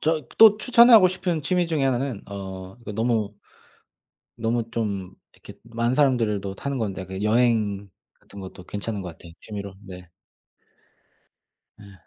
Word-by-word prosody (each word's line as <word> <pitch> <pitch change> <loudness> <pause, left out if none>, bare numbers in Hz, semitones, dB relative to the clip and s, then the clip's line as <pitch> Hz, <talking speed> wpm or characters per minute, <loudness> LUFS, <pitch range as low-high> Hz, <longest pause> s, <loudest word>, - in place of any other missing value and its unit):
저 155 -2 0
또 220 -2 +9
추천하고 230 -2 +7
싶은 180 -3 -2
취미 180 +4 +1
중의 155 -4 0
하나는 130 -3 -2
어 95 -1 -8
그 105 - -6
너무 110 -2 0 1.0
너무 115 0 -2
좀 100 -5 -3 0.2
이렇게 - - -14
많은 115 +1 -1
사람들도 115 -8 +1
타는 140 +5 -4
건데 100 -5 -3
그 95 +1 -7
여행 105 -3 +1 0.3
같은 100 - -13
것도 95 -1 -10
괜찮은 105 +1 -4
것 90 - -6
같아, 85 +1 -14
취미로. 100 -2 -7
네. 90 -1 -11 1.7
예. 100 -1 -14
110 Hz, 265 characters per minute, -24 LUFS, 100-135 Hz, 1.7 s, 또